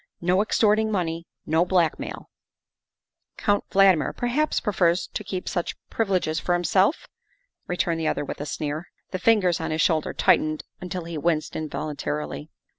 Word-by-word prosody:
No 180 +3 +2
extorting 215 0 +2
money, 170 -4 -2 0.2
no 160 +2 +3
blackmail 175 -3 -1 0.5
" - - -56
Count 205 0 +2
Valdmir 190 -5 +4
perhaps 260 +6 0
prefers 180 -4 +1
to 210 - -3
keep 190 -2 -5
such 175 -2 -2 0.2
privi 225 -3 0
leges 155 -2 -2
for 175 - 0
himself," 185 - +2 0.6
returned 175 -2 0
the 160 - -1
other 145 - 0
with - - -6
a 145 - -4
sneer. 150 +3 -3 0.2
The 185 - -3
fingers 185 -5 +3
on 160 - -2
his 155 0 0
shoulder 160 -2 +1
tightened 155 0 +2 0.2
until 180 -1 -4
he 165 -2 -5
winced 155 0 0
involuntarily. 75 - -4
175 Hz, 155 wpm, -25 LUFS, 155-195 Hz, 0.6 s, Valdmir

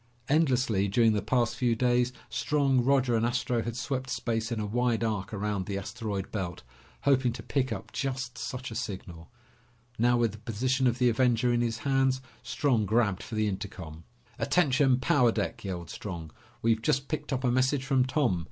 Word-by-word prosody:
Endlessly, 125 -9 +2
during 110 +3 +3
the 105 - 0
past 120 +3 +1
few 120 -1 +1
days, 125 +1 +2 0.2
Strong, 135 +1 +1
Roger, 130 -2 +3
and 110 - +1
Astro 120 0 0
had 115 0 -4
swept 130 0 -3
space 115 -1 -2
in 115 - -1
a 105 - -2
wide 120 +1 0
arc 105 -3 -2
around 105 -2 -2
the 100 -1 -2
asteroid 100 -1 -4
belt, 90 - -4 0.4
hoping 130 -3 +3
to 115 -2 -8
pick 130 -1 -1
up 100 -4 -5
just 130 -2 -3
such 125 -1 -5
a - - -6
signal. 85 -6 -6 0.7
Now, 120 +1 +4
with 115 -2 +2
the 110 - -11
position 125 +4 0
of 120 0 +1
the 125 -2 +4
Avenger 120 0 +2
in 120 - +2
his 115 -1 -1
hands, 135 0 +1 0.2
Strong 120 -8 0
grabbed 105 -2 +2
for 115 - -7
the 110 0 +1
intercom. 95 -5 -6 0.4
"Attention, 135 -6 +3
power 125 -2 +3
deck!" 100 -6 -3
yelled 90 -4 -5
Strong. 85 -6 -6 0.3
"We've 115 -1 +2
just 135 +4 +1
picked 150 -2 -4
up 130 -1 -1
a 125 - +2
message 130 +2 +1
from 130 -1 +3
Tom. 130 - +1
120 Hz, 185 wpm, -29 LUFS, 105-130 Hz, 0.7 s, Now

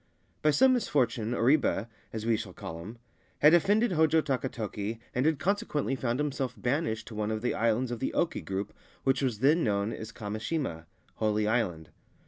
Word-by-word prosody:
By 155 - +4
some 260 - +5
misfortune 120 - 0
Oribe 120 -4 +2 0.2
(as 110 -1 -5
we 115 -1 +3
shall 100 -4 -5
call 85 -1 -7
him) 110 +7 -9 0.4
had 150 +2 +6
offended 205 +6 +4
Hojo 160 -1 +4
Takatoki, 115 -5 -3 0.2
and 130 +4 +1
had 160 -2 +2
consequently 195 -7 -1
found 120 -2 -1
himself 135 -4 -2
banished 125 -3 -1
to - - -9
one 105 0 -2
of 110 0 -3
the 125 - +1
islands 115 +3 +1
of 120 - -3
the 130 - -1
Oki 170 - 0
group 95 +1 -4 0.3
which 135 +1 +2
was 120 -5 -1
then 155 +5 +4
known 100 +1 0
as 110 +1 -7
Kami 105 -1 -5
shima 110 - -3 0.3
(Holy 105 -1 +1
Island). 90 -9 -1
120 Hz, 180 wpm, -29 LUFS, 110-150 Hz, 0.4 s, had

